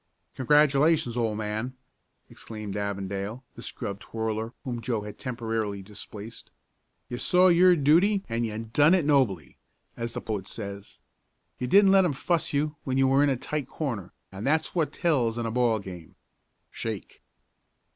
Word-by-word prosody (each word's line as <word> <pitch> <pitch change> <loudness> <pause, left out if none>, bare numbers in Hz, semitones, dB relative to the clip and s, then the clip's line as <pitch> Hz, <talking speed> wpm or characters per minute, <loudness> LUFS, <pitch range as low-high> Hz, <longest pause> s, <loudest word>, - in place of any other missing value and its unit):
"Congratulations, 145 -1 +3
old 115 -3 0
man!" 110 +4 -3 0.5
exclaimed 110 -3 -8
Avondale, 100 +3 -3
the - - -11
scrub 100 0 -5
twirler 110 0 -3
whom 120 -3 -4
Joe 115 -2 -1
had 105 0 -9
temporarily 115 -5 -3
displaced. 105 +2 -10 0.6
"You 120 - -5
saw 180 +1 +5
your 180 +1 +6
duty 175 +7 +4
and 115 0 -1
you 110 -2 -3
done 145 +10 +3
it 175 -6 +1
nobly, 130 - +1 0.4
as 115 0 -4
the - - -3
poet 105 -4 -4
says. 100 -2 -7 0.6
You 125 - -2
didn't 195 +6 +6
let 195 -1 +6
'em 175 -5 +1
fuss 165 +4 0
you 150 +1 -1
when 130 -1 -1
you 135 0 +4
were 135 +1 +4
in 145 - +3
a 135 - +1
tight 145 +1 -3
corner, 120 - -4 0.2
and 95 +2 -7
that's 155 +2 +1
what 165 -4 0
tells 125 -10 +1
in 120 - -2
a 115 - -2
ball 120 -1 +2
game. 90 -5 -9 0.6
Shake!" 110 -5 -6
120 Hz, 160 wpm, -27 LUFS, 105-145 Hz, 0.6 s, your